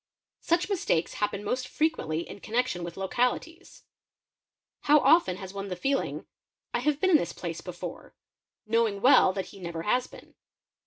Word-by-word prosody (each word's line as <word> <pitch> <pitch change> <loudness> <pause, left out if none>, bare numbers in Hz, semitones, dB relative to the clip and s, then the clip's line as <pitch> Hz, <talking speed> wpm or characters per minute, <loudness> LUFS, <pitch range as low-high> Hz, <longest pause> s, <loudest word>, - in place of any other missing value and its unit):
uch 340 +1 +3
mistakes 340 - 0
happen 205 -1 -1
most 255 +4 -2
frequently 215 - -1
in - - -9
connection 225 -5 -1
with 170 0 -7
localities; 250 - -2 1.1
ow 300 - +8
often 320 - +4
has 190 0 -8
one 200 0 -5
the 185 - -4
feeling, 270 +10 -1 0.5
"I - - +1
have 295 -1 0
been 375 +2 +2
in 320 - +8
this - - -3
place - - -5
before," - - -8 0.5
lowing 220 -2 +1
well 250 -6 +6
that 195 -1 -4
he 195 - -12
never 170 -2 -5
has 245 +6 +1
been. - - -15
230 Hz, 160 wpm, -28 LUFS, 190-295 Hz, 1.1 s, ow